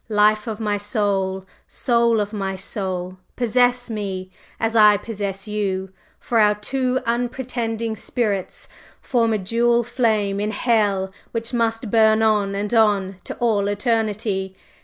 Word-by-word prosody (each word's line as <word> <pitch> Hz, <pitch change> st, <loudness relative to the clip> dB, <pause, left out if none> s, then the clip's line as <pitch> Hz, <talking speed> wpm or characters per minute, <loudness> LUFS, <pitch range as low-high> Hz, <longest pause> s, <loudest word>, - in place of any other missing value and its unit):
Life 210 Hz, +1 st, +3 dB
of 220 Hz, -1 st, -4 dB
my 210 Hz, -2 st, -1 dB, 0.2 s
life! 190 Hz, -2 st, 0 dB, 0.2 s
Soul 235 Hz, -2 st, +2 dB
of 205 Hz, +1 st, -2 dB
my 195 Hz, -2 st, -2 dB
soul! 185 Hz, -2 st, -4 dB, 0.2 s
Possess 245 Hz, +1 st, +2 dB
me, 190 Hz, -3 st, -4 dB, 0.3 s
as 225 Hz, 0 st, -1 dB
I 210 Hz, -2 st, +7 dB
possess 200 Hz, -2 st, -5 dB
you! 190 Hz, -3 st, -2 dB, 0.3 s
for 230 Hz, -, 0 dB
our 210 Hz, -1 st, +5 dB
two 255 Hz, +4 st, -1 dB
unrepenting 235 Hz, -2 st, -2 dB
spirits 205 Hz, -4 st, -2 dB, 0.3 s
form 230 Hz, -3 st, +1 dB
a 215 Hz, -, +2 dB
dual 235 Hz, +4 st, +2 dB
flame 220 Hz, -5 st, 0 dB
in 210 Hz, +1 st, -1 dB
Hell 205 Hz, -4 st, +1 dB, 0.2 s
which 230 Hz, +1 st, -3 dB
must 225 Hz, -2 st, -1 dB
burn 220 Hz, -1 st, +4 dB
on 205 Hz, -2 st, +2 dB
and 205 Hz, +3 st, -3 dB
on 200 Hz, -4 st, +2 dB
to -, -, -5 dB
all 215 Hz, -4 st, +1 dB
eternity! 205 Hz, -2 st, -1 dB
215 Hz, 140 wpm, -22 LUFS, 200-230 Hz, 0.3 s, I